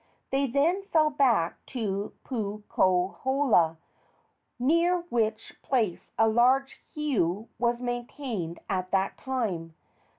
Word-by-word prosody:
They 275 +1 +2
then 300 +9 +2
fell 310 -5 +3
back 245 - +2
to 205 -5 -3
Puukohola, 205 - +1 0.8
near 335 +7 +2
which 220 -2 -1
place 225 -10 -1
a 225 - +5
large 255 +4 +3 0.2
heiau 225 - 0
was 240 0 +1
maintained 245 - -4
at 185 -1 -2
that 195 +1 0
time. 195 -12 -3
235 Hz, 100 wpm, -28 LUFS, 195-270 Hz, 0.8 s, a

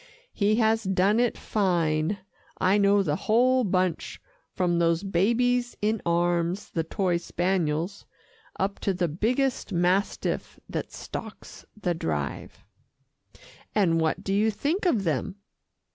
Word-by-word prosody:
"He 205 +1 +2
has 220 0 +2
done 195 +3 +2
it 245 -1 +1
fine. 175 -3 0 0.4
I 190 +3 +3
know 200 0 +4
the 150 -5 0
whole 250 +7 +3
bunch 185 -4 -1 0.3
from 175 -2 0
those 170 +1 +2
babies 240 +6 +1
in 215 +1 0
arms, 175 +2 0
the 165 - -1
toy 180 +1 0
spaniels, 175 +1 -1 0.5
up 195 +1 -1
to 195 - -1
the 175 -1 0
biggest 240 - -1
mastiff 180 +3 0
that - - -4
stalks - - -8
the 180 -4 0
Drive." 75 - -4 1.1
"And 170 -6 +3
what 160 -1 0
do 195 - -1
you 210 +2 +3
think 310 - -1
of 230 - +2
them?" 160 +1 -1
190 Hz, 130 wpm, -26 LUFS, 170-215 Hz, 1.1 s, know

